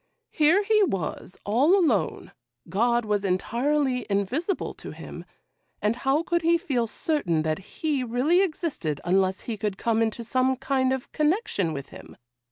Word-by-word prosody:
Here 325 +6 +4
he 425 +1 +3
was, 190 - -2
all 270 - +4
alone; 350 -5 0 0.4
God 235 +3 +1
was 205 -1 0
entirely 250 +7 0
invisible 250 - -1
to - - -10
him, - - -9 0.5
and 210 +2 +1
how 275 +5 +1
could 345 0 0
he 340 +1 +4
feel 250 -8 -1
certain 190 - -1
that 155 +1 -1
He 280 - -2
really 255 +10 +2
existed 305 - -2
unless 190 +1 +2
he 225 -3 -5
could 205 -2 -2
come 230 +2 +1
into 225 +1 -1
some 255 +3 +1
kind 260 0 0
of 265 -1 -3
connection 305 - 0
with 140 -3 -6
Him? - - -13
250 Hz, 155 wpm, -26 LUFS, 200-305 Hz, 0.5 s, Here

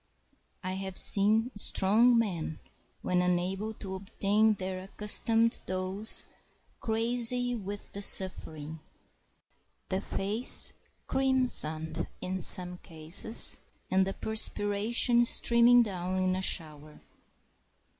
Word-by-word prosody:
I 185 - -5
have 190 0 -7
seen 215 +4 +5
strong 215 +4 +2
men, 175 -8 -4 0.4
when 180 0 -1
unable 180 +4 -3
to 195 -2 -9
obtain 205 +3 -1
their 185 -1 -7
accustomed 225 +4 +1
dose, 185 +3 -2 0.5
crazy 240 +2 0
with 205 -3 -9
the 200 - -7
suffering, 160 -6 +2 1.1
the 190 +1 -3
face 205 +5 +2 0.3
crimsoned 170 -13 -2
in 185 0 -6
some 180 +1 +1
cases, 165 +6 +2 0.3
and 190 0 +1
the 195 - -6
perspiration 220 +3 0
streaming 235 +1 +3
down 185 -3 -6
in 185 0 -1
a 185 - -5
shower. 155 -4 -4
195 Hz, 100 wpm, -27 LUFS, 185-225 Hz, 1.1 s, seen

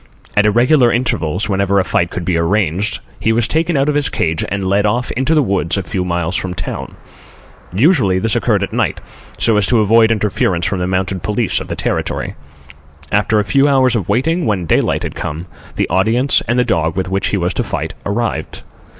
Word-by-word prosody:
At 105 0 +4
irregular 120 +3 +4
intervals, 100 -7 -1
whenever 100 -1 +1
a - - +2
fight 85 -1 0
could 90 -1 -5
be 90 - 0
arranged, 100 +4 0 0.2
he 110 - +1
was 110 0 +1
taken 160 +2 0
out 135 +1 +1
of 150 - +2
his 145 -1 0
cage 80 0 -1
and 100 0 -2
led 100 +2 +2
off 120 +4 0
into 135 +6 0
the 150 - +4
woods 95 -5 0
a 100 - -2
few 90 +2 -3
miles 85 -1 -2
from 90 -2 -2
town. 85 - -6 0.8
Usually 110 - +3
this 110 +2 0
occurred - - +1
at - - -5
night, - - 0 0.4
so 110 -2 +3
as 105 - +3
to 120 - +3
avoid 110 +2 +4
interference 100 -5 0
from 95 - -1
the 90 - -1
mounted 95 0 -1
police 105 +4 0
of - - -7
the - - -4
Territory. - - -2 0.8
After 105 +2 +2
a - - +1
few 140 +5 +3
hours 130 -3 +3
of 100 -7 -2
waiting, 165 +7 +1
when 100 -5 0
daylight - - +1
had - - -4
come, 80 +4 -5 0.3
the - - 0
audience 110 +9 +2
and 120 +2 +1
the 125 - +3
dog 80 -7 0
with 95 -1 -1
which 95 +1 -1
he 100 - 0
was 90 0 -1
to - - -1
fight - - -4
arrived. 100 -6 -3
105 Hz, 210 wpm, -16 LUFS, 90-120 Hz, 0.8 s, At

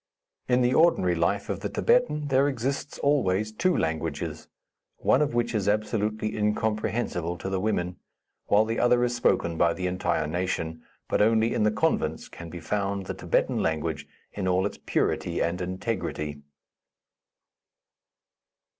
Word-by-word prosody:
In 125 0 +3
the 125 +1 +3
ordinary 155 - +4
life 85 +4 0
of 100 -2 -3
the 105 +1 -3
Thibetan, 150 - +2
there 135 +1 +4
exists 135 +2 -3
always 110 -8 +1
two 175 +11 +1
languages, 80 -2 -3 0.5
one 135 - +3
of 145 -5 0
which 120 0 0
is 105 -3 0
absolutely 105 0 -1
incomprehensible 105 -4 -1
to 95 - -5
the 95 - 0
women, 90 -3 -1 0.5
while 105 +2 +4
the 115 +1 -2
other 120 0 +4
is 120 0 0
spoken 85 -8 +1
by 85 -1 +3
the 90 - -4
entire 90 -3 0
nation; 80 -1 -2 0.3
but - - +1
only 110 +2 +3
in - - 0
the 105 - +4
convents - - 0
can 85 -1 -9
be 85 - -7
found 100 +2 -2
the - - -4
Thibetan - - 0
language 80 -1 -1 0.3
in 95 -2 -3
all 95 +1 +2
its 100 - -4
purity - - 0
and 85 +2 -1
integrity. 85 -6 -3
105 Hz, 150 wpm, -27 LUFS, 85-120 Hz, 0.5 s, ordinary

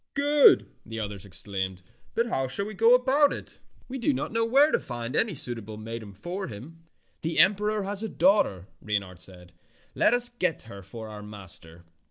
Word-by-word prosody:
'^ - - -58
"Good!" 290 0 +6 0.2
the 115 0 -7
others 105 -3 -5
exclaimed, 95 0 -4 0.3
"but 230 - +2
how 135 - -1
shall 165 +10 0
we 215 - -6
go 225 +4 +6
about 275 +3 +3
it? - - -8 0.3
We 265 +1 -5
do 280 +5 +2
not - - -3
know 230 0 +1
where 275 +7 +5
to - - +2
find 120 +1 -5
any 220 -6 +1
suitable 115 -5 -2
maiden 110 -1 -7
for 175 - -5
him." 130 +10 -10 0.4
"The 165 +1 -2
emperor 210 +1 +3
has 200 +1 -2
a 220 - -2
daughter," 180 - +2 0.2
Reynard 100 -4 -3
said. 90 -2 -9 0.4
"Let 235 - +3
us 245 0 +5
get 185 -9 -2
her 100 -3 -10
for 110 +4 -9
our 105 -1 -8
master. 95 -5 -10
130 Hz, 190 wpm, -27 LUFS, -, 0.4 s, Good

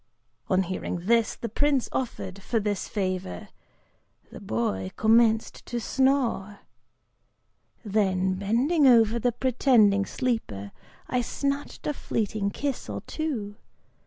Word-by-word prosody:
On 190 0 +3
hearing 180 -1 -4
the 230 0 +1
price 285 -3 +2
offered 200 -6 -4
for 225 +4 0
this 205 -2 -2
favor, 185 - -3 0.8
the - - -9
boy 100 -4 -2
commenced 225 0 +3
to 240 - -2
snore! 240 -6 0 1.2
Then, 190 -3 +1
bending 245 - +2
over 230 -2 +5
the 245 +2 +1
pretending 230 -5 +3
sleeper, 110 - -2 0.4
I 250 - 0
snatched 280 +4 -3
a 300 - 0
fleeting 215 -6 -2
kiss 275 +5 -4
or - - -4
two. 230 -10 -4
220 Hz, 110 wpm, -26 LUFS, 195-250 Hz, 1.2 s, over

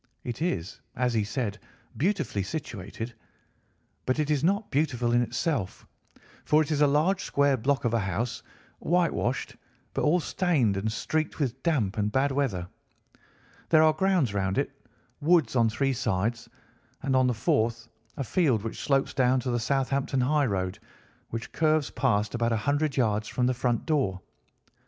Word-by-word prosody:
It 120 +4 -5
is, 95 - -2
as 125 -1 0
he 110 -2 +2
said, 105 -1 -3 0.4
beautifully 160 - 0
situated, 115 - -5 0.9
but 130 - +1
it 155 -1 0
is 145 -1 +1
not 200 +5 +1
beautiful 130 -5 +1
in 120 0 +4
itself, 120 - -2 0.6
for 155 +1 +4
it 155 - -6
is 150 -1 +1
a 145 - +6
large 155 +7 +2
square 140 -1 +2
block 130 +2 0
of 120 - +1
a 115 - +3
house, 110 +4 -2 0.4
whitewashed, 170 -8 0 0.4
but - - -1
all 165 +4 +3
stained 155 - +1
and 105 +3 -1
streaked 155 +7 -2
with 130 -3 -2
damp 115 - 0
and 105 0 0
bad 135 +4 +2
weather. 120 -11 -1 1.0
There 155 -1 +6
are 155 0 +5
grounds 175 - +1
round 95 -1 -1
it, - - 0 0.5
woods 155 -6 +3
on 115 -2 +4
three 135 +5 0
sides, 115 -1 -1 0.5
and 135 - +1
on 130 0 +4
the 125 - 0
fourth 115 +1 0 0.3
a 140 - -1
field 130 - +1
which 115 - -5
slopes 135 -1 +1
down 130 0 +3
to 125 - -2
the 120 - 0
Southampton 135 +1 0
highroad, 120 -10 0 0.5
which 115 0 -5
curves 155 -2 +1
past 110 -5 +1
about 120 0 0
a - - +1
hundred 145 +5 0
yards 110 -4 +1
from 125 - 0
the 130 - +2
front 120 -1 -1
door. 135 - 0
130 Hz, 165 wpm, -27 LUFS, 110-150 Hz, 1.0 s, a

